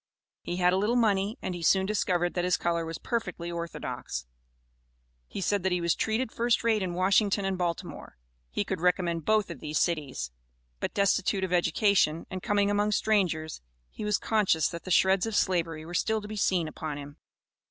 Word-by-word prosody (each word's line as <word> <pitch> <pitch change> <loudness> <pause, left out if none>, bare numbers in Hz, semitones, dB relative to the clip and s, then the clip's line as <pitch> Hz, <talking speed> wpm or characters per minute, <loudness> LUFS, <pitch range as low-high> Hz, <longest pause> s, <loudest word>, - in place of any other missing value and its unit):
He 175 - -4
had 180 0 +3
a - - +2
little 210 +5 +1
money, 210 -1 +2
and 185 - -2
he 175 - -6
soon 190 +3 +3
discovered 180 -4 0
that 175 - -1
his 180 0 +2
color 170 -1 -1
was 165 - -5
perfectly 225 -8 -3
orthodox. 170 - -5 1.0
He - - -6
said 200 +2 +1
that 190 +1 0
he 180 - +1
was 170 -1 +2
"treated 220 +2 -1
first 235 -1 +1
rate 225 -2 +2
in 180 -2 -2
Washington 195 +2 +2
and 195 0 0
Baltimore;" 175 -2 -4 0.3
he 65 - -1
could - - -3
recommend 175 -3 +1
both 215 -4 +2
of 160 - -8
these 150 0 -3
cities. 145 - -1 0.5
But - - -3
destitute 200 0 +2
of 185 -1 -1
education, 175 -1 +2
and 185 -1 -4
coming 205 +1 +1
among 205 +1 +1
strangers, 180 - 0 0.3
he - - -7
was 210 -1 +2
conscious 200 -8 +2
that 170 -1 -8
the - - -6
shreds 190 +3 +4
of 220 - -3
slavery 165 -5 0
were 175 - -9
still 220 +4 +1
to 210 - -9
be 215 - -6
seen 185 -5 +1
upon 155 -1 -5
him. 145 +1 -9
185 Hz, 195 wpm, -28 LUFS, 170-205 Hz, 1.0 s, shreds